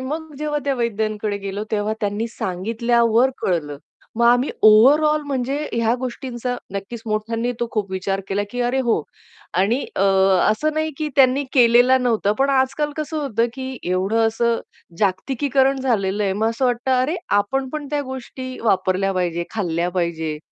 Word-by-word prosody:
मग 305 +4 -5
जेव्हा 300 0 -1
त्या 280 -1 +1
वैद्यांकडे 215 -3 -2
गेलो, 200 +1 -5
तेव्हा 210 0 0
त्यांनी 205 +2 -1
सांगितल्यावर 230 +5 +1
कळलं. 150 -6 -2 0.4
मग 235 - +2
आम्ही 245 +3 +4
ओव्हरऑल 295 +8 +6
म्हणजे 270 -1 -1 0.2
ह्या 230 0 +1
गोष्टींचा 250 -1 -4 0.2
नक्कीच 210 +4 -6
मोठ्यांनी 225 +3 -1
तो 240 - 0
खूप 205 -3 -2
विचार 190 +1 -2
केला, 200 +1 0
की 245 - -4
"अरे 245 +2 0
हो." 230 -10 +1 0.6
आणि 225 +8 +1
अ, - - +1 0.5
असं 305 +9 0
नाही 315 0 0
की 310 -1 -1
त्यांनी 270 +1 +4
केलेला 245 +1 +5
नव्हता, 230 -5 +1
पण 275 +1 +2
आजकाल 270 +3 +1
कसं 310 +1 -4
होतं, 240 -6 0
की 260 -1 -6
एवढं 200 +5 +2
असं 230 +1 0 0.4
जागतिकीकरण 265 +7 +1
झालेलं 210 -6 0
आहे 195 - +1
मग 215 +3 0
असं 230 +3 -2
वाटतं, 245 +1 0
"अरे 295 +7 0 0.2
आपण 265 +6 -1
पण 300 0 -5
त्या 295 -1 0
गोष्टी 260 -1 -7
वापरल्या 195 -2 +1
पाहिजे, 175 -2 -1
खाल्ल्या 175 -5 -1
पाहिजे." 165 -4 -2
235 Hz, 160 wpm, -21 LUFS, 205-265 Hz, 0.6 s, ओव्हरऑल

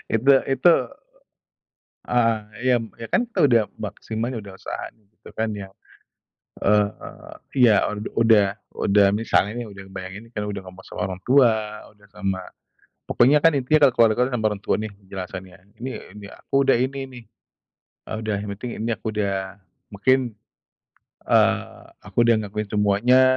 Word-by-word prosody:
Itu 130 +5 +5
itu, 135 +6 +4 1.4
eee, 115 0 0
yam 120 -2 +2
ya 115 -1 -8
kan 240 - +3
kita 225 - -5
udah 120 -5 +5
maksimal 110 +3 -4
ya 120 - -4
udah 100 -2 -10
usaha - - -6
gitu 110 -1 -19
kan 110 0 -1
yang, 100 -2 -7 0.9
eee, 105 0 0 0.3
iya 110 -5 +6
ud 105 +1 -5
udah 105 -3 +4 0.2
udah 100 0 +3
misalnya 105 -1 +1
nih 120 - -5
udah 100 -2 -10
ngebayangin 95 +4 -8
udah 105 -3 -4
ngomong 95 +1 -12
sama - - -8
orang 90 0 -7
tua, 110 -5 +3
udah 105 -1 -23
sama 95 -2 -2 0.7
pokoknya 135 +5 +4
kan 165 -3 +5
intinya 140 +2 +4
kalau 130 - 0 0.2
keluarga 125 +3 0
sama 110 - -2
orang 100 -1 -5
tua - - +1
nih 110 -1 -4
penjelasannya, 95 -1 -8 0.2
"Ini 130 +2 -4 0.2
ini 105 -1 -10
aku - - -18
udah 135 - +5
ini 130 +3 -1
nih." 125 -2 -12 0.9
Eee, - - -2
udah 110 -1 -2
yang 105 - -6
penting 120 +3 -6
ini 115 +2 -2
aku - - -7
udah 100 -2 0 0.6
mungkin, 130 +6 +3 1.1
eee, - - +2 0.2
aku - - -14
udah 115 - +5
ngakuin 105 +1 -4
semuanya 105 +5 +4
110 Hz, 155 wpm, -23 LUFS, 100-125 Hz, 1.4 s, iya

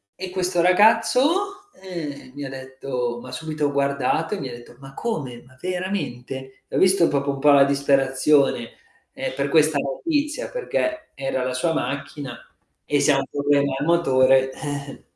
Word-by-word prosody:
e 185 0 -6
questo 180 -1 0
ragazzo, 250 - +3
ehm, 160 -8 -7
mi 145 +1 -7
ha 135 - -5
detto 130 -2 -4
m'ha - - -10
subito 155 -2 -2
guardato 140 +4 0
e 210 - -3
mi 135 -2 -5
ha - - -7
detto: 120 0 -12
"Ma 135 0 -13
come? 135 - -4
Ma 130 - -20
veramente?" 140 -8 -4
E - - -7
ho - - +3
visto 185 -2 +5
proprio 140 0 0
un 140 - -5
po' 145 +1 +5
la 140 -1 +7
disperazione, 140 -2 +2 0.4
ehm, - - -4
per 140 0 -1
questa 155 -1 +4
notizia, 290 - -2
perché 320 -10 -2
era 135 -1 -2
la 130 0 -2
sua 145 +6 0
macchina 140 0 -4 0.5
e 145 -1 +1
se 145 +2 +4
ha 135 -1 +3
problemi 140 -1 +1
al 145 - -1
motore, 135 -5 +4
eh. 145 -1 -6
145 Hz, 165 wpm, -23 LUFS, 135-180 Hz, 0.5 s, la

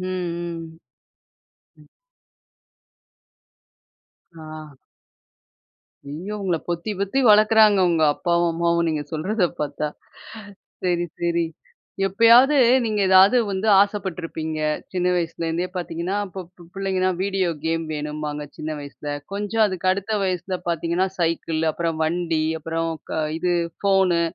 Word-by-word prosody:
ம். 170 -3 -5 1.0
ம். 150 - -19 2.5
ஆ. 155 -2 -10 1.3
ஐயோ! 175 +9 -6
உங்கள 180 -3 0
பொத்தி 170 +5 -3
பொத்தி 200 +6 -1
வளக்குறாங்க. 215 -1 +6
உங்க 165 -2 +1
அப்பாவும் 170 +1 +1
அம்மாவும் 170 0 +1
நீங்க 155 -2 -1
சொல்றத 185 +6 0 0.2
பாத்தா! 150 +1 -2 1.0
சரி, 175 -1 +1 0.2
சரி. 170 0 +1 0.6
எப்பயாவது 235 +8 +6 0.3
நீங்க 215 -2 -1
ஏதாவது 190 +5 +7
வந்து 195 +3 -1
ஆசைப்பட்ருப்பீங்க, 175 -6 -1 0.3
சின்ன 180 -1 -1
வயசுலேருந்தே 165 0 -2
பாத்தீங்கன்னா, 175 +2 -3
இப்போ 190 0 -7
ப்பு 175 -1 -18
பிள்ளைங்கன்னா, 190 -1 0
வீடியோ 190 -2 0 0.2
கேம் 165 0 0
வேணும்பாங்க. 150 0 -4
சின்ன 155 - -5
வயசில. 145 +1 -6 0.2
கொஞ்சம் 210 +2 +1
அதுக்கு 185 -2 -2
அடுத்த 200 +3 -2
வயசுல 185 0 -2
பாத்தீங்கன்னா 170 +2 0
சைக்கிள். 165 -1 -1
அப்புறம் 165 0 -2
வண்டி. 165 -1 0 0.2
அப்புறம் 165 +1 -2 0.2
க 160 - -1 0.2
இது 180 +1 0 0.3
ஃபோனு. 190 -3 +3
175 Hz, 110 wpm, -22 LUFS, 165-195 Hz, 2.5 s, ஏதாவது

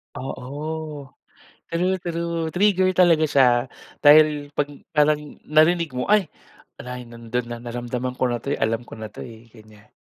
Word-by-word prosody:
Oo. 130 +2 -6 1.1
True, 180 +3 0
true, 170 -1 -2
trigger 190 -1 +3
talaga 170 -4 +5
siya. 135 -3 +5 0.5
Dahil 150 -1 +5
'pag 145 0 0 0.3
parang 150 0 +3 0.2
narinig 160 +2 +3
mo, 125 0 -3
"Ay! 205 -6 +3 0.5
Wala, 125 0 -7
eh, 125 - -9
nando'n 115 +1 -4
na, 120 0 -6
naramdaman 120 +1 -4
ko - - +1
na 120 -1 -2
'to, 140 - -4
eh, - - -2
alam 115 +2 0
ko 115 - -12
na 110 - -5
'to, - - -11
eh," 115 0 -12
ganiyan. 110 -2 -18
140 Hz, 160 wpm, -23 LUFS, 120-165 Hz, 1.1 s, talaga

